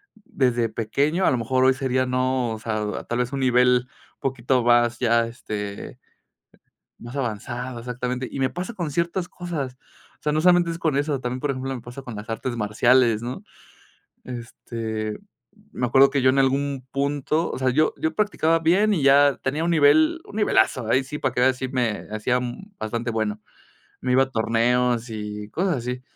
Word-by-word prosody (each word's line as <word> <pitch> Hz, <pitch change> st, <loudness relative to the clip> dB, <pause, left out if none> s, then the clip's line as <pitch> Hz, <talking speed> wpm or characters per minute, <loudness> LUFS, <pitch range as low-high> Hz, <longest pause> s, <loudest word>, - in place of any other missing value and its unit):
desde 125 Hz, -, 0 dB
pequeño, 140 Hz, -, 0 dB
a -, -, +4 dB
lo 130 Hz, -, +1 dB
mejor 130 Hz, +3 st, +1 dB
hoy 130 Hz, 0 st, +5 dB
sería 130 Hz, -1 st, 0 dB
no, 130 Hz, -2 st, 0 dB
o 110 Hz, -, -6 dB
sea, 110 Hz, -2 st, -3 dB
tal 120 Hz, -, -3 dB
vez 125 Hz, 0 st, -1 dB
un 135 Hz, -, -2 dB
nivel 125 Hz, -1 st, +4 dB
un -, -, -29 dB
poquito 130 Hz, -1 st, 0 dB
más 120 Hz, 0 st, +3 dB
ya, 115 Hz, -1 st, +2 dB
este 105 Hz, -3 st, -6 dB, 1.0 s
más 120 Hz, +3 st, -9 dB
avanzado, 125 Hz, 0 st, -4 dB
exactamente. 125 Hz, +1 st, -4 dB
Y -, -, -6 dB
me 130 Hz, -1 st, +1 dB
pasa 185 Hz, +6 st, -5 dB
con 170 Hz, -7 st, -4 dB
ciertas 170 Hz, +3 st, -1 dB
cosas. 155 Hz, -9 st, -5 dB, 0.4 s
o -, -, -37 dB
sea, 150 Hz, -, 0 dB
no 155 Hz, -, +1 dB
solamente 175 Hz, 0 st, +4 dB
es 165 Hz, -, -4 dB
con 160 Hz, -4 st, 0 dB
eso, 145 Hz, -1 st, 0 dB
también, 125 Hz, 0 st, -3 dB
por 145 Hz, -, -1 dB
ejemplo, 135 Hz, 0 st, -3 dB
me 125 Hz, -, -6 dB
pasa 120 Hz, +3 st, -9 dB
con 125 Hz, -3 st, -8 dB
las 105 Hz, +1 st, -8 dB
artes 120 Hz, +2 st, -3 dB
marciales, 115 Hz, +2 st, +3 dB
¿no? 120 Hz, +2 st, -5 dB, 0.8 s
Este, 115 Hz, -3 st, -5 dB, 0.5 s
me 125 Hz, -, -1 dB
acuerdo 135 Hz, +3 st, +5 dB
que 140 Hz, -, 0 dB
yo 130 Hz, -, +5 dB
en 135 Hz, -, +1 dB
algún 135 Hz, 0 st, 0 dB
punto, 145 Hz, +4 st, -1 dB
o -, -, -4 dB
sea, 130 Hz, 0 st, +1 dB
yo 155 Hz, +5 st, +2 dB
yo 160 Hz, 0 st, -1 dB
practicaba 165 Hz, -5 st, +2 dB
bien 195 Hz, +6 st, +3 dB
y 160 Hz, -, -1 dB
ya 140 Hz, 0 st, +5 dB
tenía 145 Hz, +4 st, -1 dB
un 170 Hz, -, +1 dB
nivel, 310 Hz, -, +4 dB
un 205 Hz, -, -11 dB
nivelazo, 130 Hz, -, +2 dB
ahí 130 Hz, +3 st, +2 dB
sí 150 Hz, +3 st, -6 dB
para 130 Hz, -3 st, -1 dB
que 125 Hz, -, 0 dB
veas 130 Hz, 0 st, +4 dB
si 130 Hz, 0 st, -4 dB
me 125 Hz, -5 st, -1 dB
hacían 125 Hz, -, -2 dB
bastante 115 Hz, +2 st, -3 dB
bueno. 110 Hz, -2 st, -2 dB, 0.6 s
Me 125 Hz, -, -1 dB
iba 130 Hz, +1 st, +5 dB
a 135 Hz, -, -13 dB
torneos 120 Hz, +1 st, +1 dB
y 105 Hz, -1 st, -6 dB
cosas 180 Hz, -, 0 dB
así. 125 Hz, +1 st, -4 dB
130 Hz, 190 wpm, -23 LUFS, 120-140 Hz, 1.0 s, hoy